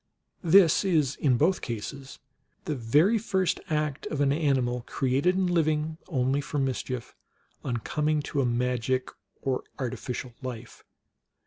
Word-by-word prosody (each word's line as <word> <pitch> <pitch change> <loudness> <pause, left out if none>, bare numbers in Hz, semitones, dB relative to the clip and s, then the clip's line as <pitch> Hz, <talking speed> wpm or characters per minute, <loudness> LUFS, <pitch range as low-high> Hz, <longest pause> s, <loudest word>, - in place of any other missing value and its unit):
This 175 0 +6
is, 155 -8 +2
in 130 -5 +2
both 175 +8 +2
cases, 135 +4 -6 0.5
the - - -1
very 150 - +3
first 190 -4 0
act 150 -2 -1
of 150 - -3
an 140 -1 +3
ani 145 -3 +2
mal, 120 0 -1
created 135 +7 +1
and 190 -1 +1
living 155 -2 +1
only 135 -2 +1
for 145 - -4
mischief, 130 -2 -2 0.5
on 120 - -1
coming 150 +5 0
to 140 0 -1
a - - +1
magic 125 +1 0 0.3
or 130 -1 -1
artificial 125 -1 -4
life. 120 -3 -7
140 Hz, 140 wpm, -27 LUFS, 125-155 Hz, 0.5 s, This